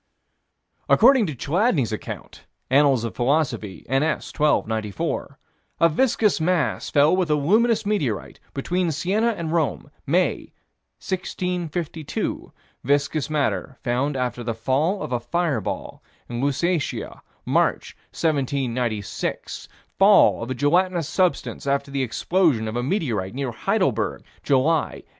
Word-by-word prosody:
According 245 -2 +6
to 155 - -4
Chladni's 155 - +1
account 110 - -8 0.2
(Annals 135 -3 +4
of 115 - -4
Philosophy, 120 -7 -1
n.s., 135 +5 0
12 150 -1 +2
94) 110 -4 -3 0.4
a 165 - +5
viscous 215 -1 +2
mass 170 -3 0
fell 145 +4 +4
with 185 -3 0
a 150 - +4
luminous 215 +10 +2
meteorite 145 - -2 0.2
between 175 +5 0
Siena 190 +9 0
and 165 -2 -3
Rome, 155 -3 -1 0.2
May, 175 +6 0 0.5
1652; 175 -4 -3 0.3
viscous 145 +2 0
matter 145 -3 -1
found 135 +3 0
after 125 -1 -2
the 115 -1 -3
fall 145 - 0
of - - -6
a 125 - 0
fire 160 -1 -1
ball, - - -5 0.3
in 120 0 -4
Lusatia, 150 +4 -1 0.2
March, - - 0 0.2
1796; 125 - -2 0.3
fall 200 +1 +6
of 115 - -5
a 130 - -2
gelatinous 170 +4 +2
substance, 180 -6 -1
after 140 0 0
the 140 0 -1
explosion 130 -1 +1
of 110 - -4
a 120 - 0
meteorite, 120 - -2
near 135 -2 -2
Heidelberg, 110 - 0 0.2
July, 145 +4 +1
1811. - - -38
145 Hz, 125 wpm, -23 LUFS, 125-175 Hz, 0.5 s, According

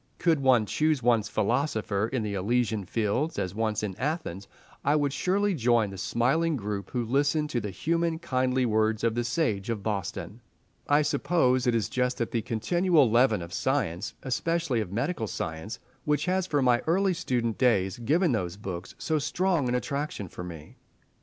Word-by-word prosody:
Could 165 -3 +2
one 130 -5 +4
choose 150 +3 +1
one's 115 -3 +3
philosopher 110 -2 0
in 125 -2 -2
the 105 -1 -3
Elysian 110 +1 0
fields, 115 - -1
as 90 0 -2
once 110 0 -1
in 100 -3 -3
Athens, 130 - -3 0.4
I 145 +2 +3
would 145 -2 +1
surely 200 +5 +1
join 120 - +2
the 95 - -8
smiling 150 - +1
group 100 -3 -4
who 120 -2 -2
listened 145 +5 +1
to 120 - 0
the 105 - -4
human, 165 - 0
kindly 130 -5 0
words 110 -1 +1
of 115 -1 +2
the 120 +1 -1
Sage 120 -5 -1
of 110 -4 -2
Boston. 105 +2 -4 0.5
I 145 +1 +5
suppose 130 -4 +2
it 120 - +3
is 115 - +1
just 125 0 -1
that 115 - -2
continual 150 - +2
leaven 115 -5 +3
of 85 +2 -9
science, 105 - -1
especially 135 0 0
of 95 -4 -5
medical 120 - -1
science, 80 +5 -5 0.3
which 150 -1 +1
has 185 0 0
from 145 -6 +1
my 120 -1 +4
early 190 +3 +3
student 120 -9 -1
days 100 -6 +2
given 155 +8 +2
those 95 -6 -2
books 95 -3 -6
so 155 -1 0
strong 165 -2 0
an 125 - +1
attraction 140 -5 -3
for 90 - -8
me. 80 -4 -10
125 Hz, 175 wpm, -27 LUFS, 105-150 Hz, 0.5 s, I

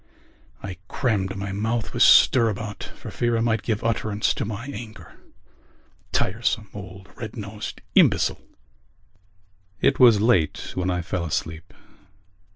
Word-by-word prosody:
I 95 -2 -6
crammed 100 -7 -1
my 100 -1 -4
mouth 110 +3 -2
with - - -2
stirabout 110 -3 +4
for - - -9
fear 120 -1 0
I - - 0
might 115 -2 +1
give 110 -2 -2
utterance 110 -2 0
to - - -3
my 110 +3 -5
anger. 120 -6 -9 1.0
Tiresome 105 +1 -1
old 95 -1 -10
red 110 -3 -7
nosed 105 0 -7
imbecile! - - +3 1.4
It 135 - +2
was 120 -5 +7
late 105 -8 +1
when 90 0 -1
I 90 -1 -1
fell 85 +1 -3
asleep. 80 +1 -4
105 Hz, 130 wpm, -24 LUFS, 95-115 Hz, 1.4 s, was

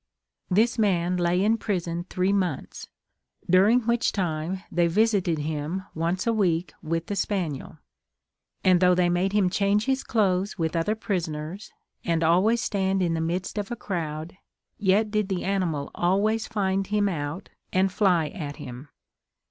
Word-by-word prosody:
This 225 +6 +2
man 180 -4 +2
lay 175 +1 +2
in 225 +2 +2
prison 175 -3 -2
three 185 +2 +1
months, 180 -8 -2 0.6
during 200 +7 +5
which 235 +1 +1
time 175 0 -2
they 170 0 +2
visited 195 -2 +2
him 155 +4 -3
once 170 +3 -1
a 230 - +2
week 180 -5 0
with 165 +1 -2
the 205 - -3
spaniel, 180 -8 -2 0.9
and 185 -1 +5
though 180 0 +5
they 175 -1 +3
made 180 +2 +1
him 205 -2 +3
change 200 +3 +1
his 265 0 0
clothes 195 -3 0
with 165 -1 -1
other 170 +6 +1
prisoners, 175 -2 -4 0.3
and 165 -1 0
always 190 +8 +3
stand 190 -2 0
in 170 -2 +1
the 165 - -1
midst 180 +5 -2
of 205 - -4
a 240 - -3
crowd, 160 -6 -4 0.4
yet 210 +2 +2
did 210 -2 0
the 185 -2 -2
animal 180 -7 -1
always 210 +5 +1
find 195 -3 -1
him 210 0 +1
out, 160 -1 -4 0.2
and 190 +1 +2
fly 180 -6 +2
at 150 -8 -6
him. 125 +4 -9
185 Hz, 155 wpm, -26 LUFS, 170-205 Hz, 0.9 s, during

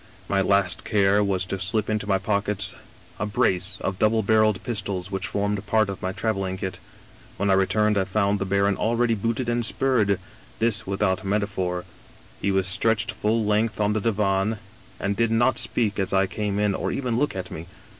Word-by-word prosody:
My 100 -1 +2
last 100 -1 +2
care 100 0 +3
was 95 -2 0
to 95 +1 -4
slip 100 +3 0
into 105 -1 -1
my 100 -2 +3
pockets 100 0 -1 0.4
a 105 - -1
brace 95 -2 +1
of 95 -1 -3
double 110 +1 +3
barreled 110 -1 +3
pistols 100 -5 -3
which 95 +1 -2
formed 105 -1 -1
part 110 -1 +2
of 95 - -8
my 95 - -1
traveling 95 -2 -2
kit. 95 -1 -5 0.6
When 100 0 +1
I - - +5
returned 105 +2 +2
I 95 - +1
found 100 +1 +1
the 100 - -1
baron 100 +1 +2
already 115 +1 +1
booted 115 +3 -1
and 120 0 0
spurred; 110 -5 +1 0.4
this 115 -2 0
without 95 -1 0
meta 100 +1 +1
phor. 90 -3 -3 0.6
He 100 - +1
was 95 -1 +2
stretched 110 +4 +1
full 110 +1 0
length 105 +2 +1
on 105 0 +2
the 110 - 0
divan, 105 0 +1 0.4
and 100 +1 -1
did 115 +1 +2
not 120 +3 +2
speak 105 -4 -1
as 95 - -1
I 95 0 +4
came 100 +1 -3
in, 105 -1 +2
or - - -2
even 125 -3 -1
look 145 -6 0
at 90 -1 -5
me. 80 +2 -7
100 Hz, 195 wpm, -24 LUFS, 95-110 Hz, 0.6 s, I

